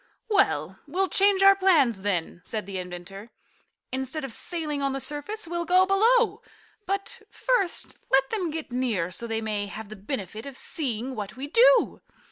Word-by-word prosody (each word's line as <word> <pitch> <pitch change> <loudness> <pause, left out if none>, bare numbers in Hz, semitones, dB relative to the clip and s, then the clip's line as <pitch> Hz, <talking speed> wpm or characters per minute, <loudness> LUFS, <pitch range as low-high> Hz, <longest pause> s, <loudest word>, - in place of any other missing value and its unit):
"Well, 405 -2 +1
we'll 370 +5 0
change 395 -1 +4
our 395 0 +8
plans, 315 - +3
then," 175 -3 -2
said 215 -3 -3
the 195 -1 -5
inventor. 180 +4 -8 0.6
"Instead 265 +3 -2
of 255 - -4
sailing 310 -3 -3
on 275 -1 0
the 270 - -2
surface 300 +9 -3
we'll 345 +1 -2
go 365 +2 +4
below. 435 +2 +3 0.5
But 395 +5 -2
first 480 -8 0
let 270 0 +4
them 375 -6 -1
get 315 -3 -5
near 230 -9 -1
so 235 +6 -4
they 225 0 -2
may 210 -2 -2
have 205 +2 -8
the 215 - -8
benefit 215 - -5
of 270 -2 -7
seeing 255 -4 -2
what 210 -2 -6
we 270 - -4
do. - - +4
275 Hz, 170 wpm, -26 LUFS, -, 0.6 s, our